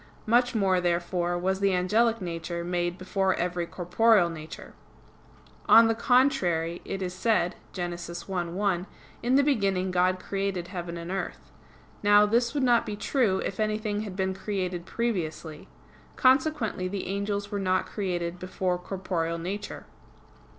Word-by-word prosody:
Much 245 +2 +3
more, 190 -4 +2
therefore, 175 0 0
was 190 +2 0
the 195 -1 +2
angelic 225 +6 +2
nature 170 -1 -4
made 175 0 -1
before 190 0 0
every 175 -1 -2
corporeal 180 +1 +3
nature. 155 -1 -9 1.0
On 230 0 +9
the 225 - +2
contrary, 220 - +2
It 195 -1 -4
is 180 -1 -3
said 190 -2 +1 0.2
(Gen. 175 -2 -3
1:1): 175 +2 -3 0.3
"In 245 +2 +2
the 280 - +5
beginning 195 -9 +1
God 185 +1 +2
created 195 -2 -3
heaven 175 -2 -5
and 170 +1 -6
earth." 195 0 -5 0.5
Now, 205 0 +6
this 235 +5 +1
would 280 - +1
not 240 -2 +4
be 210 - -5
true 205 -4 +1
if 195 - -4
anything 215 -1 -1
had 205 -4 -6
been 190 0 0
created 185 -3 -3
previously. 165 -9 -3 0.5
Consequently 260 -7 +2
the 195 +1 -4
angels 200 +1 -2
were 205 - -2
not 185 -1 +1
created 175 -3 -3
before 185 0 -2
corporeal 180 -3 -3
nature. 195 +5 -5
190 Hz, 145 wpm, -27 LUFS, 175-210 Hz, 1.0 s, On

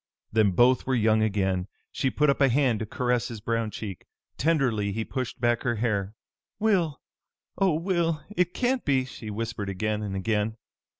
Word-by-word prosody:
Then 110 -2 +4
both 120 +8 +3
were 130 - +2
young 110 -1 +3
again. 95 -3 0 0.2
She 135 - 0
put 150 +1 +3
up 140 - -3
a 135 - +6
hand 125 -3 +2
to 110 - -4
caress 125 +1 0
his 115 -2 -7
brown 115 0 -1
cheek. 100 -3 -7 0.3
Tenderly 130 -10 +1
he 110 +2 -2
pushed 130 -3 -4
back 120 -1 +2
her 120 -2 0
hair. 105 -3 -1 0.4
"Will! 185 -9 +1 0.6
Oh, 190 -5 +3
Will! 165 -2 0
It 180 0 +1
can't 255 0 +1
be!" 130 -3 +2
she 115 -4 -8
whispered 105 -1 -3
again 105 +2 -1
and 100 -2 -4
again. 105 +2 -1
115 Hz, 175 wpm, -27 LUFS, 105-140 Hz, 0.6 s, a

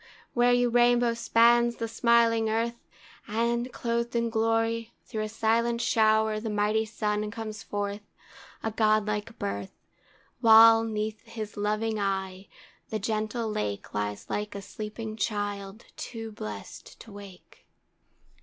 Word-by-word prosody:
where 245 0 +4
you 245 0 +3
rainbow 240 0 +3
spans 235 +1 +4
the 230 - -3
smiling 230 -1 +3
earth, 230 -3 -2 0.4
And, 235 +3 -1
clothed 235 0 -2
in 235 -1 0
glory, 225 0 0
through 220 -3 -4
a 215 - -3
silent 230 +2 +1
shower 220 -1 +2
The 220 +1 -4
mighty 210 +1 +1
Sun 210 -1 -2
comes 215 -1 -6
forth, 205 0 -4 0.6
a 225 - -1
godlike 215 0 0
birth; 100 0 -4 0.7
While, 225 -1 +8
'neath 215 -1 -3
his 220 -2 -7
loving 215 +1 -1
eye, 190 -1 -2 0.4
the 220 - -2
gentle 215 +2 -2
Lake 105 - -3
Lies 105 0 -3
like 210 0 -3
a 200 - -5
sleeping 215 +2 -6
child 205 -1 -3
too 225 -2 -7
blest 105 - -9
to 225 - -13
wake! 200 -3 -13
220 Hz, 130 wpm, -27 LUFS, 210-230 Hz, 0.7 s, While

